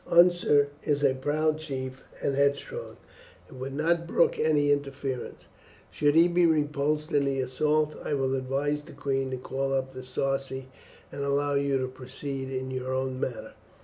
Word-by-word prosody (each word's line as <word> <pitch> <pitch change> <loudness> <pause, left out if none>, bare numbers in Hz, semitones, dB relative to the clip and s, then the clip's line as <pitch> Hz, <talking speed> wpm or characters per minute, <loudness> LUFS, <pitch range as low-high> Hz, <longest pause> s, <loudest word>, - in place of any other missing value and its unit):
Unser 170 -5 +5
is 145 -1 0
a 135 -2 +5
proud 155 +4 0
chief, 130 -4 -5 0.2
and 140 - +1
headstrong, 140 - -1 0.5
and 130 - -12
would 135 +1 -5
not 170 +3 +1
brook - - +2
any 145 -2 +3
interference. 140 -2 -3 0.4
Should 145 0 +2
he 165 +2 +7
be 175 0 +4
repulsed 150 0 +1
in 145 -3 +3
the 135 -1 0
assault, 150 +4 +1
I 150 - -1
will 135 -1 0
advise 135 +3 -1
the - - -13
queen 135 -2 -1
to 130 - -3
call 135 +2 -2
up 130 0 -2
the 130 - -7
Sarci, 135 +1 -2 0.4
and 140 - -4
allow 140 +1 +1
you 140 -1 +2
to 130 0 -1
proceed 130 +1 -6
in 130 0 -3
your 130 0 -3
own 130 0 -1
manner." 125 -3 -4
140 Hz, 170 wpm, -28 LUFS, 130-150 Hz, 0.5 s, he